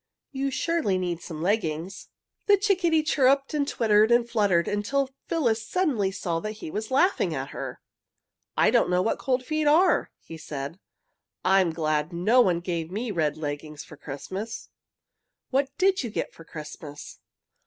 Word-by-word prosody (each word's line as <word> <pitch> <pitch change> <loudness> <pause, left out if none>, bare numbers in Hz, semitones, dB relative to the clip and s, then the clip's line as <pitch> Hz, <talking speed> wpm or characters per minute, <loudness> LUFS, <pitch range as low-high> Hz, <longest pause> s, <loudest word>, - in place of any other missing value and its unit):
"You 275 0 -1
surely 305 - 0
need 175 -2 -2
some 160 -1 -6
leggings." 180 -2 -1 0.4
The 405 -1 +6
chickadee 365 -6 +2
chirruped 275 -1 +2
and 290 -2 0
twittered 215 -4 +3
and 240 0 +4
fluttered 205 -7 +2
until 260 +7 0 0.2
Phyllis 235 -9 +1
suddenly 275 - +1
saw 175 -3 -2
that 215 +4 -4
he 210 -7 -8
was 215 +4 -4
laughing 265 - +2
at 135 +1 -4
her. - - -6 0.8
"I - - +5
don't - - +3
know 180 0 +2
what 225 - 0
cold 255 -1 0
feet 310 +1 0
are!" 330 +6 +4
he 165 - -10
said. 145 +2 -6 0.7
"I'm 190 -1 +4
glad 155 -1 -1
no 210 +9 +4
one 180 -6 +2
gave 170 -2 -3
me 215 +5 -3
red 155 -5 0
leggings 150 0 -5
for 155 - -13
Christmas." 190 +11 -6 0.8
"What 270 +1 +2
did 385 +1 +3
you 240 - -4
get - - -4
for 165 - -13
Christmas?" 150 -1 -9
205 Hz, 160 wpm, -26 LUFS, 165-270 Hz, 0.8 s, The